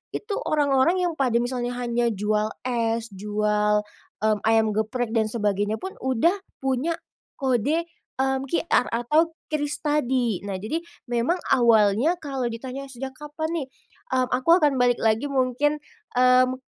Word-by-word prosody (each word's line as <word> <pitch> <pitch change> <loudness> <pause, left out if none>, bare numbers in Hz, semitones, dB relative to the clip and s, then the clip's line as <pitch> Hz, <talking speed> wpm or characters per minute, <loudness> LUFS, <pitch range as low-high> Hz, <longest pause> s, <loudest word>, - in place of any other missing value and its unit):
itu 420 -1 -4
orang-orang 290 +2 +3
yang 350 - +1
pada 250 -4 +1
misalnya 245 0 -2
hanya 240 -1 0
jual 210 +1 0 0.2
es, 230 -2 -1
jual, 210 +1 +1 0.4
mmm, 215 -1 +2
ayam 220 -1 +4
geprek 220 +2 -1
dan 220 -2 +2
sebagainya 210 -1 0
pun 380 +10 -6
udah 260 - +2 0.3
punya 270 +6 0 0.4
kode, 270 +5 +1 0.3
mmm, 265 0 0
QR 335 -4 +1
atau 305 +8 +1 0.2
QRIS 295 0 -2
tadi. 255 -8 +1
Nah, 195 - -3
jadi 220 - -3 0.3
memang 240 +10 +1
awalnya 230 - +4
kalau 270 -6 -3
ditanya, 260 +4 -6
sejak 265 0 -6
kapan 300 +2 -4
nih, 295 -6 -2 0.5
mmm, 255 -1 +1
aku 255 +6 0
akan 275 -3 +3
balik 245 -1 +3
lagi 225 +5 +2
mungkin, 275 +2 +1 0.4
mmm, 255 0 +5
250 Hz, 140 wpm, -24 LUFS, 225-285 Hz, 0.5 s, mmm